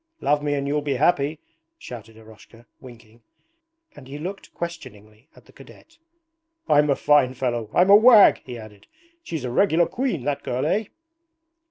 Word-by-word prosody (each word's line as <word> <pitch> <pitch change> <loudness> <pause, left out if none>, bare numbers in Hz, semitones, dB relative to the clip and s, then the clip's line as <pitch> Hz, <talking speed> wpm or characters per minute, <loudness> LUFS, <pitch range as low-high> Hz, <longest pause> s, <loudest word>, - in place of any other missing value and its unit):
'Love 145 0 0
me 145 0 -2
and 140 0 -3
you'll 150 +1 -1
be 145 -2 -2
happy,' 145 +1 +1 0.4
shouted 115 - -11
Eroshka, 110 +1 -18
winking, 120 -2 -16 0.7
and 130 - -14
he 140 +2 -8
looked 185 +6 -8
questioningly 125 -8 -10
at - - -20
the - - -20
cadet. 330 +1 -18 0.7
'I'm 150 0 +3
a 140 - +3
fine 135 -3 +2
fellow, 120 -4 -3
I'm 185 +3 +3
a - - +10
wag!' 220 -1 +6
he 125 -2 -9
added. 105 -3 -14 0.3
'She's 160 - -6
a 125 - -4
regular 170 +3 +2
queen, 240 - -3
that 145 +1 -3
girl. 125 +3 -3
Eh?' 205 +7 0
140 Hz, 165 wpm, -22 LUFS, 120-165 Hz, 0.7 s, a